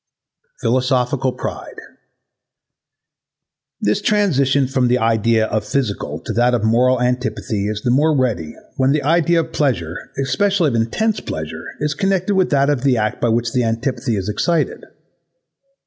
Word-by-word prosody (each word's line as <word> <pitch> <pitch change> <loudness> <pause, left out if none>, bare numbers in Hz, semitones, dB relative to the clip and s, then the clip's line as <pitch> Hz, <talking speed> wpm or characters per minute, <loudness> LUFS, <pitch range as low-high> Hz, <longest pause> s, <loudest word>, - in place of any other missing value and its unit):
Philosophical 130 +1 +1
pride - - -6 2.1
This 105 +1 +1
transition 140 -10 +2
from 130 -1 +1
the 125 +1 +3
idea 115 -1 +2
of 110 -1 -2
physical 105 -1 -2
to - - -5
that 120 +1 +3
of 115 - -2
moral 125 +3 +3
antipathy 125 -4 -1
is 105 0 -4
the 120 - +1
more 150 +4 +3
ready 110 -12 -1 0.2
when 135 +1 +3
the 150 -2 0
idea 165 +2 +3
of 160 0 -9
pleasure, 90 - 0 0.2
especially 185 +5 +1
of - - -3
intense 210 - 0
pleasure, 80 0 -6 0.2
is 150 0 0
connected 195 +4 0
with 190 -2 +2
that 140 0 +2
of 140 -4 -1
the 135 -2 +2
act 110 -1 -1
by 120 - +2
which 115 0 0
the 125 - +1
antipathy 115 +1 -1
is 95 -2 -3
excited. 165 +9 -1
130 Hz, 150 wpm, -19 LUFS, 115-145 Hz, 2.1 s, the